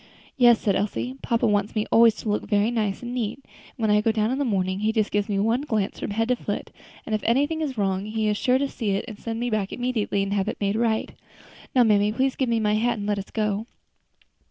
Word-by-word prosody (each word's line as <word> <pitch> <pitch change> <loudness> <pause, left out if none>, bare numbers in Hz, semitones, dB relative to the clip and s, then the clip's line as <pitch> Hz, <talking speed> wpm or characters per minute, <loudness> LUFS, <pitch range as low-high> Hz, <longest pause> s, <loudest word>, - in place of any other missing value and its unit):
"Yes," 240 -3 +6
said 200 -3 +1
Elsie, 245 +6 -2
"papa 230 -1 0
wants 205 -1 +1
me 215 0 0
always 230 -1 +6
to 220 - -5
look 210 - -2
very 205 +1 +2
nice 215 -2 -1
and 240 0 -5
neat; 230 -4 -2
and - - -30 0.3
when 220 -3 +1
I 210 0 +4
go 225 - +2
down 220 +1 0
in 265 - -1
the - - +1
morning 190 -5 0
he 215 +1 +1
just 220 -2 0
gives 205 +1 0
me 200 - 0
one 225 +6 +1
glance 220 -9 -2
from - - -4
head 225 +3 -1
to 250 - +3
foot, - - -5 0.3
and 220 - -4
if 215 - 0
anything 290 +7 +1
is 275 -5 -3
wrong 195 -1 0
he 220 0 -1
is 210 - +1
sure 250 +4 +2
to 280 +1 0
see 220 -7 -2
it 195 - -2
and 220 -4 -9
send 230 -1 -4
me 240 0 -2
back 205 -3 -1
immediately 225 -5 -1
to 200 - -3
have 200 0 0
it 225 - -3
made 200 0 0
right. 225 -1 0 0.6
Now, 250 - +6
mammy, 210 -2 +3
please 260 +4 0
give 260 -3 -1
me 230 -1 +2
my 210 -1 +1
hat 230 +2 +1
and 205 - -4
let 205 -1 0
us 195 - -8
go." 215 0 -1
220 Hz, 260 wpm, -24 LUFS, 205-240 Hz, 0.6 s, Yes